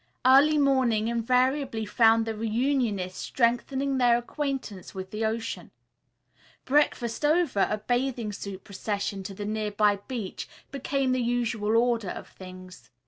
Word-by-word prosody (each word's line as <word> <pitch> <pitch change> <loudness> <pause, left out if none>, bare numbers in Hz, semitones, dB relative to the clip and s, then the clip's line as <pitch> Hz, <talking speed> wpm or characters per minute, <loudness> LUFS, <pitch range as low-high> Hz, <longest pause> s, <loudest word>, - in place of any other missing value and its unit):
Early 280 +4 +6
morning 255 -6 +2
invariably 250 +1 +1
found 225 +1 +4
the 225 - -2
reunionists 220 -4 -1
strengthening 265 +3 0
their 240 -1 +5
acquaintance 255 - -5
with 190 0 -6
the 215 +1 -3
ocean. 225 +1 -3 1.0
Breakfast 260 -3 +1
over, 305 - +2
a 210 - 0
bathing 245 -1 -1
suit 195 -1 -7
procession 200 0 -3
to 195 +1 -7
the 205 - -5
nearby 210 -1 +1
beach 235 -7 -5 0.2
became 275 -1 -1
the 255 0 +1
usual 230 -2 0
order 230 -4 +1
of - - -7
things. 185 -1 -12
230 Hz, 130 wpm, -27 LUFS, 210-260 Hz, 1.0 s, Early